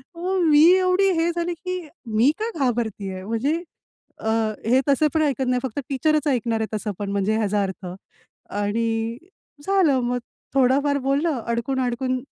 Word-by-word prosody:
मग 365 +3 -2
मी 295 0 +6
एवढी 375 +1 +3
हे 330 +1 +2
झाली 345 0 -1
की 365 0 -2 0.3
"मी 240 +6 +5
का 440 +1 -1
घाबरतेय?" 220 -7 -2
म्हणजे 275 - -1 0.6
अ, 220 - -2 0.4
हे 255 +3 +4
तसं 280 +2 +4
पण 315 - +2
ऐकत 270 -3 0
नाही 250 0 +2
फक्त 260 0 -3
टीचरच 305 +3 +1
ऐकणार 235 -4 0
आहे 220 - -1
तसं 210 0 -3
पण 205 -1 -3
म्हणजे 200 +2 +1
ह्याचा 210 -2 +1
अर्थ 190 -1 -5 0.7
आणि 225 +2 -1 0.5
झालं 365 -9 +3
मग 245 +1 -1 0.4
थोडाफार 275 +2 +3
बोललं 280 +1 +1
अडकून-अडकून 255 +1 -1
255 Hz, 150 wpm, -23 LUFS, 225-305 Hz, 0.7 s, मी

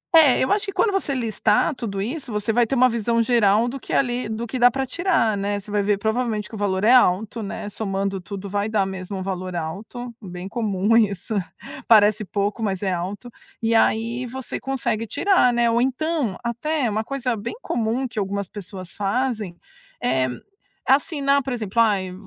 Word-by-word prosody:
É, 305 -6 +7
eu 260 - +1
acho 420 +1 +2
que - - -2
quando 415 +1 +2
você 380 -8 -1
listar 235 +5 +1
tudo 205 -6 -5
isso, 255 +4 -4
você 210 +1 -1
vai 240 0 +3
ter 270 - -1
uma 255 0 +6
visão 230 0 0
geral 225 -1 +3
do 270 +2 -4
que - - -10
ali 245 -3 0
do 220 +2 -3
que 250 +2 -4
dá 245 0 +7
pra 265 +2 -2
tirar, 330 - +1
né, 205 +1 -1
você 205 +1 -11
vai 205 0 +1
ver, 200 0 +1
provavelmente, 220 0 -1
que - - -21
o - - -5
valor 200 -1 -1
é 230 - +5
alto, 220 -1 +3
né, 205 0 -5
somando 195 -2 -2
tudo 200 +2 -7
vai 205 +2 -1
dar 210 -3 +1
mesmo 190 0 -5
um 185 - -4
valor 185 -1 -4
alto, 215 +9 -5
bem 180 -2 -7
comum 210 -1 0
isso, 210 -1 +1 0.5
parece 215 -1 +5
pouco, 205 +4 -2
mas 195 -3 -2
é 190 - +1
alto. 195 +7 -4 0.3
E 230 0 0
aí 230 +2 +1
você 260 +1 -5
consegue 230 -4 -2
tirar, 325 - +3
né, 240 0 +2
ou, 235 +1 +2
então, 265 - -1
até 255 +4 -1
uma 215 +1 -1
coisa 255 -1 -2
bem 220 - -5
comum 240 - -1
que 235 - -5
algumas 200 -1 -2
pessoas 185 -3 -9
fazem 210 -3 -2 0.4
é 130 +1 +1 0.6
assinar, 280 0 +2
por 260 0 -4
exemplo, 230 -1 0
ai, 195 -5 +1
220 Hz, 195 wpm, -23 LUFS, 200-245 Hz, 0.6 s, É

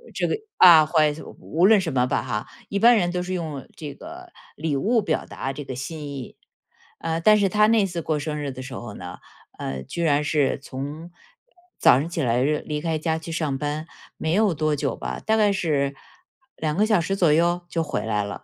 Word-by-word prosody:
这 - - 0
个， - - 0 0.2
啊， 165 -4 +9
怀 155 -2 +3 0.3
无 170 +4 +2
论 215 -1 +6
什 165 -7 -3
么 125 -1 +2
吧 125 -4 0
哈， 110 -4 -3 0.2
一 200 - -1
般 235 +2 +6
人 175 -4 +1
都 180 0 -2
是 185 +1 -4
用 155 -6 -5
这 150 -3 -6
个 350 +3 -11 0.2
礼 155 -1 -2
物 225 - +2
表 165 -6 -1
达 135 0 -5
这 145 - -6
个 130 -2 -6
心 150 +3 -6
意。 140 -3 -8 0.6
呃， 165 0 -2
但 215 +3 +6
是 200 - +3
他 210 +2 +4
那 220 -2 +4
次 175 -3 -4
过 155 -1 -1
生 150 +1 -3
日 140 -1 -3
的 130 0 -8
时 130 0 -8
候 120 -4 -7
呢， 90 0 -8 0.4
呃， 65 -1 -4
居 170 - -4
然 150 -2 +2
是 150 -2 +1
从 145 +5 -7 0.7
早 125 - +6
上 150 - -2
起 170 -2 -3
来 120 0 +1
喏 150 +1 +1
离 150 -1 -3
开 165 -1 -1
家 160 +1 -1
去 160 - -9
上 155 -4 -1
班， 150 +3 -3 0.3
没 160 0 -1
有 205 -1 +3
多 155 0 0
久 140 -1 -2
吧， - - -5
大 220 - +1
概 210 -1 +4
是 145 -7 0 0.6
2 155 +1 -2
个 210 - +4
小 215 -5 +3
时 165 +4 -2
左 170 -6 +3
右？ 170 +2 +2
就 165 -1 -1
回 150 - -3
来 105 -2 0
了。 100 0 -7
155 Hz, 235 characters per minute, -24 LUFS, 140-175 Hz, 0.7 s, 啊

